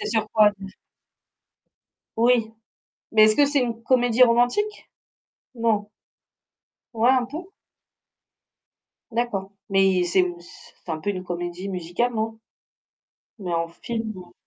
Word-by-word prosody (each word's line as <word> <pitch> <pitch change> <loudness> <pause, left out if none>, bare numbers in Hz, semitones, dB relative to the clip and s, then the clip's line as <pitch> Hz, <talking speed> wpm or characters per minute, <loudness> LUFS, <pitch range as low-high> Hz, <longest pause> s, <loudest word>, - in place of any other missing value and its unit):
c'est - - -3
sur 220 0 0
quoi 215 -1 +6
déjà? 195 0 -9 1.5
Oui. 230 -1 +3 0.6
Mais, 215 -1 +7
est-ce 215 0 +4
que 290 - +6
c'est 285 0 +1
une 235 -2 -2
comédie 245 0 +3
romantique? 245 - +1 0.7
Non? 215 -3 0 1.0
Ouais, 230 +2 +3
un 255 -2 +2
peu? 300 +8 -7 1.7
D'accord. 215 -5 -2 0.2
Mais 195 -2 +3
c'est 180 +1 +2
c'est 175 +1 -17
un 160 - -3
peu 205 +6 -3
une 185 -2 -3
comédie 175 +2 -5
musicale, 185 +7 -2
non? 225 0 -3 1.0
Mais 185 -4 -5
en 165 0 0
film, 225 +5 -5
ouais. 185 -2 -12
220 Hz, 125 wpm, -24 LUFS, 185-240 Hz, 1.7 s, Mais